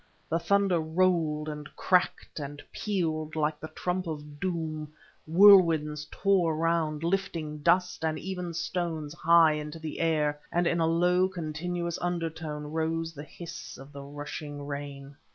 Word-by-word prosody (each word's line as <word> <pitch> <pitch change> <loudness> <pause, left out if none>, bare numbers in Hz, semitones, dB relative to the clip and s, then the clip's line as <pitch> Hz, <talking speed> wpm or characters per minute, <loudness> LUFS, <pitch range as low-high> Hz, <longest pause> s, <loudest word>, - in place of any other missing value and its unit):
The 165 - +1
thunder 195 0 +2
rolled 160 -2 +1
and 150 -1 -6
cracked 180 -3 +1
and 145 0 -6
pealed 160 -7 -2
like 150 -1 0
the 155 - -6
trump 180 +2 -3
of 150 -2 -6
doom, 160 -4 -3 0.4
whirlwinds 165 -5 +6
tore 185 -5 +2
round, 160 -1 0
lifting 165 -4 -1
dust 175 +3 +2
and 160 -1 0
even 180 -3 -4
stones 165 -4 -2
high 170 -1 +5
into 150 +1 -5
the 160 -2 -6
air, 150 -3 +1
and 175 +1 +2
in 170 0 +2
a 165 - +3
low, 180 +2 +3
continuous 170 0 -3
undertone 160 -3 -3
rose 165 +1 -1
the 145 - -8
hiss 165 +3 -9
of 135 +1 -12
the 140 - -7
rushing 145 0 -7
rain. 140 -1 -7
160 Hz, 145 wpm, -29 LUFS, 150-175 Hz, 0.4 s, whirlwinds